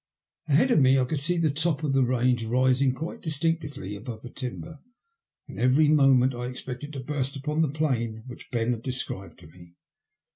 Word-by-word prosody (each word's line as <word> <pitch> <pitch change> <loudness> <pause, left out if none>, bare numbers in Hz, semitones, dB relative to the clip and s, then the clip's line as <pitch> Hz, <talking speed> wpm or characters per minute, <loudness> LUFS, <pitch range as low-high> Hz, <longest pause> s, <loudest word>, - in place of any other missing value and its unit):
Ahead 160 - +3
of 235 - +5
me 135 -1 +5
I 130 - +2
could 145 +3 -2
see 175 +5 +1
the 160 -3 +2
top 160 +1 -1
of 145 -3 0
the 135 -1 +4
range 125 -1 +1
rising 130 +3 +2
quite 160 +6 -6
distinctly 145 - -2
above 110 +1 -8
the 120 - -9
timber, 140 +5 -7 0.7
and - - -9
every 135 +5 +4
moment 135 -3 +4
I 120 0 -5
expected 125 +3 -7
to 135 - -5
burst 135 0 -2
upon 150 +3 -1
the 160 - +2
plain 120 -7 -2
which 125 -1 -11
Ben 115 0 0
had 115 -2 -3
described 125 -6 -4
to 80 - -13
me. 85 +1 -17
130 Hz, 190 wpm, -26 LUFS, 125-150 Hz, 0.7 s, of